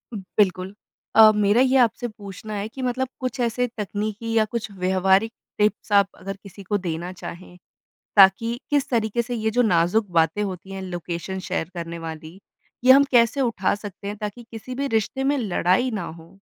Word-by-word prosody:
बिल्कुल। 190 Hz, -1 st, 0 dB, 0.4 s
अ, 220 Hz, 0 st, +9 dB
मेरा 210 Hz, +3 st, +3 dB
ये 265 Hz, 0 st, +4 dB
आपसे 240 Hz, 0 st, +2 dB
पूछना 210 Hz, 0 st, -9 dB
है 205 Hz, +1 st, -3 dB
कि 260 Hz, +4 st, -9 dB
मतलब 255 Hz, +1 st, -1 dB
कुछ 255 Hz, +1 st, -4 dB
ऐसे 245 Hz, +1 st, 0 dB
तकनीकी 210 Hz, +2 st, -3 dB
या 220 Hz, -1 st, +3 dB
कुछ 220 Hz, -2 st, -3 dB
व्यावहारिक 190 Hz, +3 st, +2 dB, 0.3 s
टिप्स 210 Hz, 0 st, 0 dB
आप 200 Hz, -1 st, +5 dB
अगर 195 Hz, 0 st, -7 dB
किसी 200 Hz, 0 st, -12 dB
को 205 Hz, +2 st, 0 dB
देना 175 Hz, -1 st, -4 dB
चाहें, 180 Hz, 0 st, -10 dB, 0.6 s
ताकि 210 Hz, +5 st, +5 dB
किस 285 Hz, -1 st, +1 dB
तरीके 230 Hz, -1 st, 0 dB
से 245 Hz, +1 st, -5 dB
ये 220 Hz, -1 st, -1 dB
जो 245 Hz, +3 st, +2 dB
नाज़ुक 185 Hz, +2 st, +2 dB
बातें 165 Hz, +4 st, +2 dB
होती 190 Hz, -1 st, -5 dB
हैं, 190 Hz, 0 st, -6 dB
लोकेशन 175 Hz, +1 st, -5 dB
शेयर 160 Hz, -, -2 dB
करने 170 Hz, 0 st, -5 dB
वाली, 160 Hz, +2 st, -8 dB, 0.4 s
ये 260 Hz, -, +9 dB
हम 280 Hz, +1 st, +7 dB
कैसे 240 Hz, +2 st, +4 dB
उठा 230 Hz, -7 st, +1 dB
सकते 205 Hz, -1 st, -9 dB
हैं, 205 Hz, -, -5 dB
ताकि 210 Hz, +3 st, -6 dB
किसी 235 Hz, +3 st, -8 dB
भी 280 Hz, +2 st, -2 dB
रिश्ते 265 Hz, +5 st, -1 dB
में 285 Hz, +1 st, +2 dB
लड़ाई 205 Hz, +2 st, +1 dB
ना 210 Hz, -5 st, -3 dB, 0.2 s
हो? 170 Hz, +4 st, -17 dB
210 Hz, 180 wpm, -23 LUFS, 185-235 Hz, 0.6 s, अ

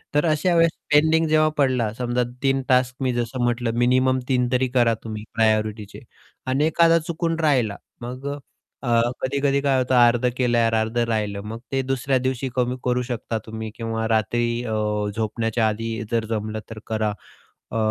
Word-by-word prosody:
तर 150 Hz, -, +3 dB
अशा 155 Hz, +3 st, +2 dB
वेळेस 165 Hz, -1 st, +4 dB, 0.2 s
पेंडिंग 160 Hz, +2 st, +4 dB
जेव्हा 155 Hz, 0 st, +4 dB
पडला, 130 Hz, -6 st, +2 dB
समजा 125 Hz, 0 st, 0 dB, 0.2 s
3 135 Hz, 0 st, +2 dB
टास्क 125 Hz, -1 st, +3 dB
मी 130 Hz, -1 st, +1 dB
जसं 120 Hz, +1 st, -2 dB
म्हटलं, 120 Hz, -1 st, 0 dB
मिनिमम 130 Hz, +1 st, +3 dB
3 125 Hz, -2 st, +2 dB
तरी 130 Hz, 0 st, +2 dB
करा 120 Hz, -2 st, +4 dB
तुम्ही 110 Hz, -1 st, -6 dB
प्रायोरिटिचे 110 Hz, -2 st, 0 dB, 0.5 s
आणि 135 Hz, +3 st, +2 dB
एखादा 165 Hz, +1 st, +4 dB
चुकून 165 Hz, 0 st, -1 dB
राहिला 130 Hz, -10 st, +2 dB, 0.2 s
मग 125 Hz, +3 st, -6 dB
अ, -, -, -10 dB, 0.5 s
अ, 115 Hz, +1 st, +3 dB
कधी-कधी 140 Hz, +1 st, +1 dB
काय 140 Hz, -2 st, +2 dB
होतं 130 Hz, 0 st, +1 dB
अर्धं 120 Hz, 0 st, +4 dB
केल, 120 Hz, -2 st, +1 dB
अर्धं 115 Hz, 0 st, +1 dB
राहिलं. 105 Hz, -3 st, -1 dB
मग 110 Hz, +2 st, -7 dB
ते 135 Hz, -1 st, +1 dB
दुसऱ्या 135 Hz, +1 st, +1 dB
दिवशी 130 Hz, 0 st, -1 dB
कमी 125 Hz, 0 st, 0 dB
करू 125 Hz, 0 st, +1 dB
शकता 115 Hz, -1 st, -3 dB
तुम्ही 110 Hz, 0 st, -6 dB
किंवा 115 Hz, -1 st, -3 dB
रात्री 120 Hz, +2 st, 0 dB
अ, 120 Hz, -, -5 dB, 0.5 s
झोपण्याच्या 115 Hz, +1 st, 0 dB
आधी 110 Hz, +1 st, -3 dB
जर 115 Hz, -1 st, +1 dB
जमलं 110 Hz, 0 st, -2 dB
तर 110 Hz, -1 st, -8 dB
करा. 110 Hz, -1 st, 0 dB, 0.6 s
अ, -, -, -5 dB
120 Hz, 170 wpm, -23 LUFS, 115-135 Hz, 0.6 s, वेळेस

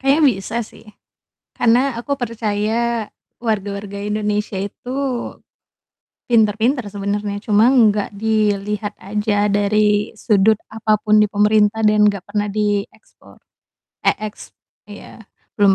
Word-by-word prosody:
Kayaknya 275 Hz, +4 st, +3 dB
bisa 195 Hz, +4 st, -6 dB
sih, 215 Hz, -, -17 dB, 0.7 s
karena 245 Hz, +2 st, +2 dB
aku 240 Hz, +4 st, -4 dB
percaya 230 Hz, -2 st, -1 dB, 0.3 s
warga-warga 200 Hz, -3 st, -3 dB
Indonesia 210 Hz, -1 st, -2 dB
itu 205 Hz, +5 st, -6 dB, 1.4 s
pintar-pintar 225 Hz, +2 st, +2 dB
sebenarnya, 205 Hz, 0 st, -3 dB
cuman 225 Hz, +2 st, +4 dB
nggak 205 Hz, 0 st, -2 dB
dilihat 210 Hz, -1 st, -1 dB
aja 210 Hz, +1 st, 0 dB
dari 210 Hz, +1 st, +1 dB
sudut 215 Hz, -1 st, +2 dB
apa 215 Hz, -1 st, 0 dB
pun 215 Hz, 0 st, +3 dB
di 210 Hz, -, +6 dB
pemerintah 210 Hz, +1 st, +2 dB
dan 210 Hz, -1 st, +4 dB
nggak 200 Hz, -3 st, +1 dB
pernah 205 Hz, +1 st, -2 dB
diekspor. 205 Hz, -, -4 dB, 0.7 s
Eh, -, -, +5 dB
ex 210 Hz, -1 st, -8 dB, 0.3 s
iya, 205 Hz, 0 st, -12 dB, 0.3 s
belum 200 Hz, -1 st, +5 dB
210 Hz, 110 wpm, -19 LUFS, 205-220 Hz, 1.4 s, di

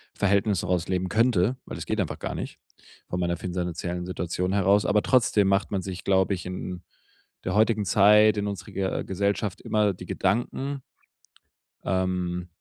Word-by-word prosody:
Verhältnis 100 Hz, -1 st, +2 dB
raus 90 Hz, -2 st, 0 dB
leben 95 Hz, 0 st, -1 dB
könnte, 115 Hz, +2 st, +2 dB
weil -, -, -7 dB
das -, -, -6 dB
geht -, -, -2 dB
einfach -, -, -4 dB
gar -, -, -4 dB
nicht -, -, -6 dB, 0.5 s
von 90 Hz, -, -2 dB
meiner 85 Hz, -1 st, 0 dB
finanziellen 90 Hz, -1 st, -3 dB
Situation 90 Hz, +1 st, -2 dB
heraus. 100 Hz, +1 st, +3 dB
Aber 105 Hz, -, +3 dB
trotzdem 110 Hz, -6 st, +3 dB
macht 100 Hz, +1 st, +1 dB
man 95 Hz, -, 0 dB
sich, 95 Hz, -1 st, -6 dB
glaube 95 Hz, 0 st, +2 dB
ich, 90 Hz, -, -5 dB
in 90 Hz, 0 st, -6 dB, 0.6 s
der 90 Hz, +2 st, -1 dB
heutigen 110 Hz, -1 st, +3 dB
Zeit, 105 Hz, +2 st, +5 dB
in 105 Hz, 0 st, -1 dB
unserer 100 Hz, -3 st, -6 dB
Ge 95 Hz, -1 st, -2 dB
Gesellschaft 100 Hz, +1 st, -1 dB
immer 105 Hz, -2 st, +1 dB
die 90 Hz, 0 st, -10 dB
Gedanken 130 Hz, +9 st, -1 dB, 1.0 s
ähm 90 Hz, -1 st, -1 dB
95 Hz, 160 wpm, -26 LUFS, 90-105 Hz, 1.0 s, Zeit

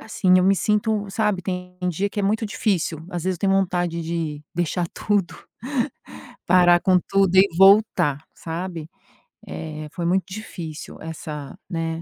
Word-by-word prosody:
assim 185 Hz, -4 st, +2 dB
eu 180 Hz, -, +3 dB
me 195 Hz, +1 st, +5 dB
sinto, 210 Hz, +2 st, 0 dB
sabe, 210 Hz, -3 st, 0 dB
tem 180 Hz, -1 st, -5 dB
dia 190 Hz, +4 st, -1 dB
que 205 Hz, 0 st, -3 dB
é -, -, -2 dB
muito 215 Hz, +3 st, +1 dB
difícil. 190 Hz, -7 st, -1 dB
Às 175 Hz, -2 st, -4 dB
vezes 185 Hz, -1 st, 0 dB
eu -, -, -22 dB
tenho 195 Hz, -1 st, +2 dB
vontade 175 Hz, -3 st, 0 dB
de 160 Hz, -3 st, -3 dB
deixar 175 Hz, +1 st, -1 dB
tudo 205 Hz, -4 st, 0 dB, 1.1 s
parar 175 Hz, -1 st, +5 dB
com 185 Hz, -1 st, +4 dB
tudo 195 Hz, -2 st, +3 dB
e 190 Hz, +1 st, +8 dB
voltar, 195 Hz, -7 st, +5 dB
sabe. 165 Hz, -1 st, -6 dB, 0.6 s
Eh, 155 Hz, -1 st, -6 dB
foi 170 Hz, -2 st, -3 dB
muito 185 Hz, +2 st, +1 dB
difícil 175 Hz, -6 st, -8 dB
essa, 150 Hz, -3 st, -7 dB
né, 165 Hz, -2 st, -3 dB
180 Hz, 155 wpm, -23 LUFS, 165-195 Hz, 1.1 s, e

